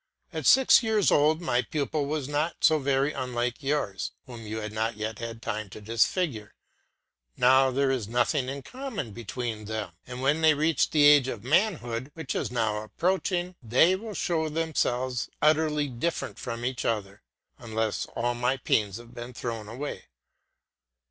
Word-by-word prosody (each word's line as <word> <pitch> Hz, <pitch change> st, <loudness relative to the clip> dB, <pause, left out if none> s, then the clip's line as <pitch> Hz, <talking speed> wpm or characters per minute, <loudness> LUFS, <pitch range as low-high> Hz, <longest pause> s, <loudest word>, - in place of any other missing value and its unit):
At -, -, -2 dB
six 265 Hz, 0 st, +7 dB
years 220 Hz, -4 st, +2 dB
old 155 Hz, +3 st, +3 dB
my 125 Hz, -7 st, +1 dB
pupil 145 Hz, +1 st, -2 dB
was 150 Hz, -2 st, -2 dB
not 150 Hz, +3 st, -2 dB
so 155 Hz, -1 st, +5 dB
very 140 Hz, +1 st, +1 dB
unlike 125 Hz, -2 st, -2 dB
yours, 135 Hz, -9 st, -2 dB
whom 120 Hz, -4 st, -9 dB
you 110 Hz, +1 st, -4 dB
had 105 Hz, -1 st, -4 dB
not 110 Hz, 0 st, -1 dB
yet 110 Hz, 0 st, -4 dB
had 115 Hz, 0 st, -6 dB
time 110 Hz, -1 st, -3 dB
to 95 Hz, -, -10 dB
disfigure; 115 Hz, -, 0 dB, 0.8 s
now 130 Hz, +1 st, +5 dB
there 135 Hz, +1 st, +1 dB
is 125 Hz, -6 st, -2 dB
nothing 125 Hz, +3 st, +1 dB
in 140 Hz, 0 st, -5 dB
common 250 Hz, -, -5 dB
between 115 Hz, 0 st, -5 dB
them; 110 Hz, -3 st, -4 dB, 0.2 s
and 125 Hz, +1 st, -6 dB
when 145 Hz, +4 st, +2 dB
they 160 Hz, -1 st, +5 dB
reach 155 Hz, +2 st, +2 dB
the 150 Hz, -2 st, +3 dB
age 145 Hz, -3 st, +7 dB
of 115 Hz, -5 st, -5 dB
manhood, 130 Hz, -, +1 dB
which 160 Hz, -5 st, -4 dB
is -, -, -2 dB
now 110 Hz, -3 st, 0 dB
approaching, 180 Hz, -, -1 dB
they 130 Hz, +10 st, +4 dB
will 210 Hz, +1 st, -7 dB
show 160 Hz, -3 st, 0 dB
themselves 130 Hz, -6 st, -1 dB
utterly 150 Hz, -1 st, +2 dB
different 135 Hz, +7 st, -3 dB
from 120 Hz, -1 st, -5 dB
each 130 Hz, 0 st, -2 dB
other, 105 Hz, -3 st, -2 dB, 0.4 s
unless 110 Hz, -2 st, -2 dB
all 120 Hz, +1 st, 0 dB
my 125 Hz, +2 st, 0 dB
pains 105 Hz, -5 st, 0 dB
have 120 Hz, 0 st, -13 dB
been 120 Hz, +1 st, -8 dB
thrown 115 Hz, -3 st, -4 dB
away. 130 Hz, +7 st, -6 dB
130 Hz, 165 wpm, -27 LUFS, 115-155 Hz, 0.8 s, six